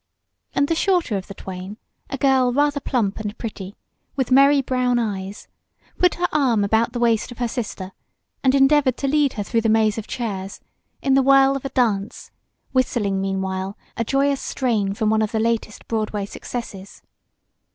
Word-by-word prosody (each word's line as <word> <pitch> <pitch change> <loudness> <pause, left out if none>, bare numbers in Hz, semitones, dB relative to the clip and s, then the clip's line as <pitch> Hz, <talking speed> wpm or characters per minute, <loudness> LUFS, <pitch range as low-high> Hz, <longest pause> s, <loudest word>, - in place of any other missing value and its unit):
and 285 - +2
the 330 - +1
shorter 345 - +1
of 190 -2 -4
the - - -8
twain, 190 +2 -8 0.3
a 275 - -3
girl 260 -2 +3
rather 290 +2 +1
plump 225 -8 -1
and 210 0 -5
pretty, 205 -4 -7 0.4
with 265 -2 -1
merry 275 +2 +6
brown 255 -2 +1
eyes, 200 -3 -4 0.5
put 360 -1 +3
her 355 0 0
arm 245 -8 +2
about 220 +3 +2
the 245 - -4
waist 230 -1 +1
of 245 - -10
her 245 - -1
sister 210 -6 -5 0.5
and 265 0 +4
endeavored 270 -2 +4
to 275 - -2
lead 290 -1 +2
her 205 - -3
through 230 +3 0
the 225 - +1
maze 220 0 +2
of 220 - -8
chairs 200 -6 -4 0.4
in 270 - +2
the 270 - +5
whirl 275 0 +5
of 275 - -5
a - - -2
dance, 215 -6 -1 0.4
whistling, 215 -7 0
meanwhile, 190 0 -3 0.2
a 230 - -1
joyous 275 +3 +1
strain 215 -7 -1
from 215 0 +1
one 220 0 +2
of 215 - -1
the 220 - 0
latest 225 -1 -2
Broadway 215 -2 -2
successes. 200 -2 -8
230 Hz, 180 wpm, -22 LUFS, 205-270 Hz, 0.5 s, merry